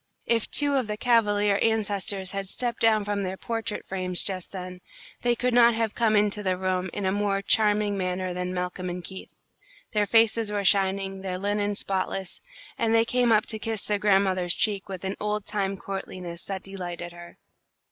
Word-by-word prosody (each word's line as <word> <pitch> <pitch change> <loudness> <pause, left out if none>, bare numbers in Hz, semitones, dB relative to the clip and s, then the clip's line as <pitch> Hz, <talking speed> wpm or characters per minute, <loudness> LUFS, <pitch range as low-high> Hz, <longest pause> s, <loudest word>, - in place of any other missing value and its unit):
If 230 -2 +1
two 290 -1 +2
of 260 -5 +1
the 210 0 -3
cavalier 210 -4 +3
ancestors 205 -3 0
had 195 -1 -3
stepped 240 +4 -2
down 220 -2 +4
from 205 0 -1
their 190 0 -3
portrait 225 -1 -3
frames 185 -2 -1
just 185 -3 -4
then, 180 -1 -7 0.4
they 240 0 +2
could 250 +1 0
not 235 -1 +6
have 225 -1 0
come 225 -2 +2
into 210 0 +2
the 185 -2 0
room 185 0 -1
in 205 - -4
a 190 - +2
more 200 0 0
charming 210 -1 +2
manner 185 0 -2
than 180 0 -3
Malcolm 180 0 -3
and 175 0 -5
Keith. 190 +3 -8 0.6
Their 210 -1 +1
faces 225 -1 +4
were 205 -1 -1
shining, 195 0 +2
their 185 -1 -3
linen 205 +1 -1
spotless, 190 -1 -2 0.4
and 230 -1 +2
they 225 0 +5
came 245 0 +2
up 215 -1 +4
to 220 - -4
kiss 220 -1 -3
their 210 -1 0
grandmother's 190 -3 +2
cheek 200 -2 0
with 190 -1 -6
an 190 - -3
old 210 -1 -2
time 195 -2 -2
courtliness 185 -3 -6
that 195 -1 -4
delighted 175 -3 -6
her. 175 0 -12
200 Hz, 190 wpm, -26 LUFS, 185-215 Hz, 0.6 s, not